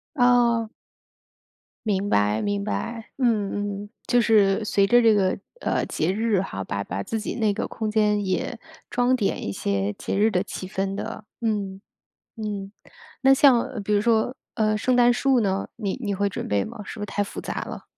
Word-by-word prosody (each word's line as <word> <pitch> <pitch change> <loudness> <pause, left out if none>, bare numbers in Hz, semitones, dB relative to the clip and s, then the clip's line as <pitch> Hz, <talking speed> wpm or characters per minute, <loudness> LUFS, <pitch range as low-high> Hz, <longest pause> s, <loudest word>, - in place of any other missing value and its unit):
哦。 240 -3 +3 1.2
明 200 -1 0
白 105 - +2
明 100 -1 -1
白， 220 - -4
嗯 205 -4 0
嗯。 - - -16 0.2
就 245 0 +4
是 210 -2 +4
随 200 -1 +3
着 240 +3 +6
这 225 -2 +5
个， 190 -3 +2 0.2
呃， - - 0
节 160 +4 -1
日 215 -2 +1
哈， 95 - -5
把 100 +2 -3
把 95 +1 -4
自 225 - -3
己 215 - -4
那 215 -3 +1
个 - - -3
空 220 -2 -3
间 210 -1 +2
也 190 +5 -2 0.3
装 245 +1 +2
点 210 - -1
一 - - -2
些 100 0 -1
节 - - -3
日 215 +2 +4
的 180 -1 +1
气 190 -1 -6
氛 195 +1 -2
的。 220 +1 -5 0.2
嗯， 205 -4 -1 0.6
嗯， 205 -2 -5 0.5
那 270 0 +6
像 260 -4 +3
比 210 - -1
如 205 - +4
说， 230 +2 +2 0.2
呃， 215 -2 +1
圣 250 +4 +1
诞 245 0 +6
树 260 0 +2
呢？ 195 -2 0
你 205 -5 -2
你 205 -3 -1
会 200 +1 +1
准 - - -5
备 100 -1 +1
吗？ - - -8
是 - - -8
不 - - -5
是 - - -2
太 205 +1 -1
复 205 - -6
杂 - - -4
了？ - - -7
210 Hz, 205 characters per minute, -24 LUFS, 195-230 Hz, 1.2 s, 着